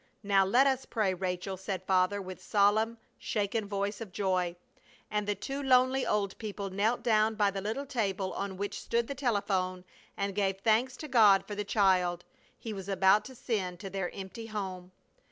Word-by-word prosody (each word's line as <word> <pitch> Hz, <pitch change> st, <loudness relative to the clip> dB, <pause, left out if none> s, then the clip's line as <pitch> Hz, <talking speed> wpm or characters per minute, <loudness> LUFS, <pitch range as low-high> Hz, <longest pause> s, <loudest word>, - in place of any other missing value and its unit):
"Now 200 Hz, -1 st, +4 dB
let 240 Hz, +8 st, +4 dB
us 265 Hz, -1 st, +1 dB
pray, 210 Hz, -5 st, 0 dB
Rachel!" 185 Hz, +1 st, -3 dB
said 190 Hz, -1 st, -4 dB
Father, 185 Hz, +1 st, +2 dB
with 185 Hz, 0 st, -8 dB
solemn, 215 Hz, +3 st, +2 dB, 0.2 s
shaken 210 Hz, 0 st, -1 dB
voice 200 Hz, +1 st, -2 dB
of 215 Hz, -5 st, -7 dB
joy. 180 Hz, -2 st, 0 dB, 0.6 s
And 210 Hz, -1 st, -1 dB
the 205 Hz, -, +1 dB
two 270 Hz, +8 st, -4 dB
lonely 260 Hz, 0 st, +3 dB
old 200 Hz, -2 st, 0 dB
people 200 Hz, -3 st, -5 dB
knelt 210 Hz, +5 st, 0 dB
down 220 Hz, -1 st, +3 dB
by 205 Hz, -2 st, +2 dB
the 195 Hz, 0 st, -4 dB
little 225 Hz, +8 st, -3 dB
table 200 Hz, -7 st, -2 dB
on 195 Hz, -1 st, -4 dB
which 200 Hz, +1 st, -4 dB
stood 235 Hz, 0 st, 0 dB
the 280 Hz, -, -4 dB
telephone 195 Hz, -8 st, -1 dB, 0.3 s
and 200 Hz, 0 st, -1 dB
gave 195 Hz, -1 st, 0 dB
thanks 225 Hz, +5 st, +2 dB
to 305 Hz, -, -7 dB
God 215 Hz, -7 st, +5 dB
for 210 Hz, -, -6 dB
the 210 Hz, 0 st, -2 dB
child 185 Hz, -4 st, +2 dB, 0.3 s
He 225 Hz, -, -6 dB
was 195 Hz, -1 st, -7 dB
about 195 Hz, +2 st, +4 dB
to 260 Hz, -, -10 dB
send 190 Hz, -8 st, -2 dB
to 195 Hz, -2 st, -6 dB
their 190 Hz, -2 st, -2 dB
empty 195 Hz, +4 st, -8 dB
home. 190 Hz, -4 st, -5 dB
200 Hz, 185 wpm, -30 LUFS, 190-225 Hz, 0.6 s, God